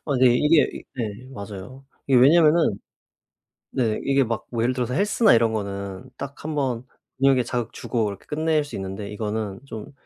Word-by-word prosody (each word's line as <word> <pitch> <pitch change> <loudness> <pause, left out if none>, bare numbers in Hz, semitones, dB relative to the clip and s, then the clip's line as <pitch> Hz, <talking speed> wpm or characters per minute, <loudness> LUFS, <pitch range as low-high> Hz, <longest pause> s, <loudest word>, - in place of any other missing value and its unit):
아 145 - 0
네. 130 - +6
이게 150 +3 +3
네 115 +1 -4
맞아요. 105 +5 -9 0.2
이게 135 -2 +5
왜냐하면은 155 - +5 0.9
네 115 -5 0
이게 135 -1 +3
막 115 -1 -3
뭐 115 -2 -1
예를 125 +2 +1
들어서 125 0 -2
헬스나 210 - +4
이런 115 -1 +3
거는 100 +3 -5
딱 140 0 -8
1 155 0 -3
번 130 -4 -1 0.3
근육에 135 -1 +4
자극 120 -1 -3
주고 115 -4 -1
이렇게 100 -1 -8
끝낼 155 0 +1
수 145 - -8
있는데 95 +1 -5
이거는 105 -1 -3
좀 110 +1 -8
125 Hz, 320 characters per minute, -24 LUFS, 105-140 Hz, 0.9 s, 네